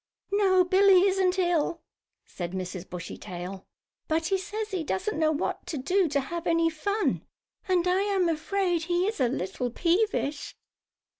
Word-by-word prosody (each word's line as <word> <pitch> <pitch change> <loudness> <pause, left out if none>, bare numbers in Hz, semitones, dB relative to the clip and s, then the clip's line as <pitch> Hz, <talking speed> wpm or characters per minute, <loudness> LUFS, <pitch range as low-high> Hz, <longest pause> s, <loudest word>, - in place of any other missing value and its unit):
"No, 385 -2 +4
Billie 375 +1 +5
isn't 380 -1 +2
ill," 340 -2 +1 0.4
said 175 -1 -6
Mrs. 185 -1 -5
Bushytail. 180 +1 -7 0.4
"But 320 +1 0
he 385 +3 +1
says 425 +3 -5
he 370 -4 -2
doesn't 310 - -2
know 310 -1 +3
what 310 +3 -3
to 335 -4 -3
do 365 +7 +2
to 280 -1 +1
have 340 +5 -5
any 330 0 +3
fun, 405 +7 -1 0.4
and 365 -1 +2
I 365 +2 +3
am 395 -3 +1
afraid 340 +1 0
he 350 +1 +1
is 430 -2 -2
a 255 - +3
little 235 +2 -3
peevish." 335 - 0
345 Hz, 155 wpm, -27 LUFS, 290-385 Hz, 0.4 s, Billie